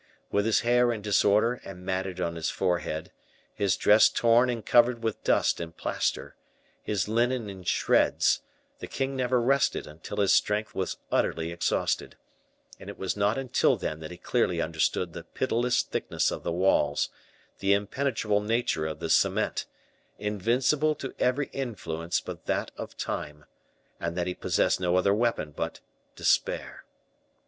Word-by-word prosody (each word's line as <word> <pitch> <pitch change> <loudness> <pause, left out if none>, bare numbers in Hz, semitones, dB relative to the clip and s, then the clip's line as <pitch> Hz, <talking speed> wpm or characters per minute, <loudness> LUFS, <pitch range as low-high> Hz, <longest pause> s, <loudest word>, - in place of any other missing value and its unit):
With 100 +1 +1
his 115 - +3
hair 120 0 +3
in 110 -3 -4
disorder 105 +4 +3
and 90 -1 -10
matted 95 -1 -2
on 85 -2 -1
his 80 - -2
forehead, 80 -3 -2 0.4
his 100 -2 +1
dress 105 +1 +6
torn 120 +2 +3
and 115 -3 -3
covered 120 -1 +4
with 110 -2 -2
dust - - +2
and 85 -1 -7
plaster, - - -2 0.5
his 105 -3 -1
linen 120 0 0
in 95 -1 -10
shreds, 90 - +2 0.4
the - - -7
king 135 0 -2
never 125 -1 +1
rested 135 +3 +1
until 75 +2 -9
his 100 -2 +3
strength 105 +1 +1
was 95 - -3
utterly 80 0 0
exhausted, 85 0 -1 0.6
and - - -10
it - - -8
was 95 - -2
not 105 +3 +1
until 135 -2 +2
then 75 - -4
that 80 -1 -7
he 90 - -9
clearly - - 0
understood 90 -2 0
the - - -7
pitiless 120 +1 0
thickness - - -1
of - - -5
the - - -3
walls, 85 -5 +2 0.5
the 100 - +1
impenetrable 105 0 0
nature 105 -8 0
of 80 - -5
the - - -2
cement, - - +1 0.5
invincible 125 +9 +1
to 135 -2 -6
every 130 +3 +1
influence 85 -10 -3
but - - -9
that - - -1
of - - -8
time, 75 0 -5 0.5
and 85 +1 -3
that 90 - 0
he 90 - -2
possessed - - +1
no 90 -1 +1
other 95 +2 +3
weapon 110 -8 0
but - - -4 0.4
despair. - - 0
105 Hz, 155 wpm, -27 LUFS, 90-120 Hz, 0.6 s, dress